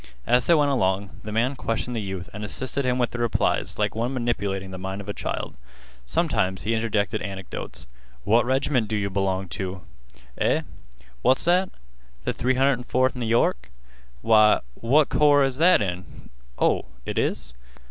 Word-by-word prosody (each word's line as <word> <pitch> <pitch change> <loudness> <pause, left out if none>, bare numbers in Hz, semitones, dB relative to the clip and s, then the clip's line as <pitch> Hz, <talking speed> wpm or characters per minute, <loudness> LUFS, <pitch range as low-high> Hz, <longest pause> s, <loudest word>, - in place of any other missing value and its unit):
As 125 0 +3
they 170 - +6
went 145 -2 +3
along, 95 -5 0
the 105 - -6
man 120 +6 +1
questioned 120 0 -3
the 115 - -1
youth 95 -4 -5
and 105 +1 -6
assisted 130 +6 -2
him 125 0 +1
with 120 -2 0
the 120 - -5
replies 120 -2 0
like 105 -1 0
one 120 +4 -2
manipulating 100 -6 -2
the 95 - -7
mind 95 +1 -5
of 100 - -9
a 105 - -3
child. - - -4 0.5
Sometimes 95 +9 0
he 110 +3 0
interjected 110 -1 0
anecdotes. 95 -2 -7 0.4
"What 115 +3 +4
reg'ment 130 -2 +1
do 110 0 -1
yeh 100 -1 -1
b'long 95 -1 -1
teh? 95 +1 -4 0.6
Eh? - - +2 0.6
What's 130 - +3
that? 180 +2 +3 0.6
Th' - - -1
304th 130 0 +1
N' 125 - -5
York? 110 - +1 0.5
Why, 110 -1 +5
what 135 - +2
corps 145 -1 +4
is 135 -1 -1
that 170 -7 +5
in? 90 -6 -7 0.3
Oh, - - +2 0.2
it - - -2
is? 70 -3 -2
115 Hz, 165 wpm, -24 LUFS, 95-130 Hz, 0.6 s, they